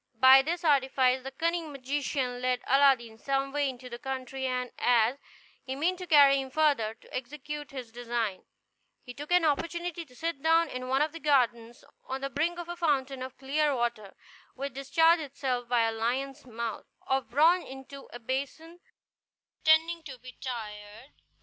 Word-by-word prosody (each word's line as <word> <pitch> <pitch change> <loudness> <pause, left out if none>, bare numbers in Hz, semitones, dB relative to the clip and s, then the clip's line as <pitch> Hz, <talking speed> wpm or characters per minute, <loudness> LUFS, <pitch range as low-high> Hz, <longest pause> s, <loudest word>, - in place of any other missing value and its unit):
By 260 +2 +9
this 335 +5 -3
artifice 265 -3 +3
the 265 - -6
cunning 330 +3 -2
magician 265 -2 -2
led 255 0 0
Aladdin 260 -5 +3
some 275 +1 -1
way 290 -1 0
into 255 -1 -9
the 240 -1 -8
country; 265 -1 -4
and 250 -1 -2
as, 245 +2 +3 0.4
he 265 - -5
meant 350 +6 0
to 365 - -7
carry 280 -4 +6
him 265 - -7
further, 270 -7 +1
to - - -13
execute 295 +3 -6
his 255 -4 -8
design, 230 -4 -3 0.6
he 250 - -9
took 295 +5 -9
an 355 -2 +4
opportunity 340 +3 -1
to 255 -6 -20
sit 325 -1 -3
down 325 +1 +3
in 255 0 -5
one 265 +3 +2
of 310 - -2
the 330 - -8
gardens, 240 -5 +1 0.2
on 265 +1 -5
the 275 0 -3
brink 325 +6 0
of 345 -1 -6
a 345 - -5
fountain 275 -6 0
of 260 0 -7
clear 285 +2 +1
water, 235 -5 -3 0.4
which 275 0 -5
discharged 320 +5 +3
itself 260 -4 -3
by 245 -1 +3
a 225 - +1
lion's 260 +5 -3
mouth 230 -2 -5 0.2
of 265 -3 -1
bronze 325 +8 +4
into 270 +1 -11
a - - -7
basin, 280 +8 -5 0.8
pretending 325 +2 +4
to 275 -5 -9
be 255 +1 -12
tired. 220 0 -7
270 Hz, 175 wpm, -29 LUFS, 250-300 Hz, 0.8 s, By